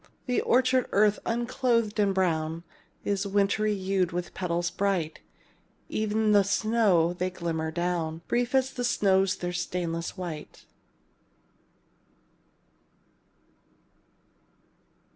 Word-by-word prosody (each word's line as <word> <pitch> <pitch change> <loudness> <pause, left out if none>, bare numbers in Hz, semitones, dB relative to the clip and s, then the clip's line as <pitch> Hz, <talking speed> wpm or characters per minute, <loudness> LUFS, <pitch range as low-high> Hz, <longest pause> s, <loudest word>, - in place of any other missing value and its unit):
The 250 -2 +1
orchard 255 0 +2
earth, 210 +1 +4
unclothed 235 -2 0
and 200 -1 +3
brown, 165 -3 0 0.4
Is 200 0 0
wintry 205 +2 +1
hued 190 -2 0
with 175 0 -4
petals 175 -1 -1
bright; 190 -6 -1 0.7
E'en 215 0 0
as - - +4
the 205 -1 +6
snow 200 -5 +2
they 180 +1 -2
glimmer 165 -3 -3
down; 170 -1 -2
Brief 245 +2 0
as 265 0 +2
the 245 - -3
snow's 195 -5 +2
their 175 0 -4
stainless 175 -1 -3
white. 165 -5 -7
195 Hz, 105 wpm, -27 LUFS, 175-215 Hz, 0.7 s, the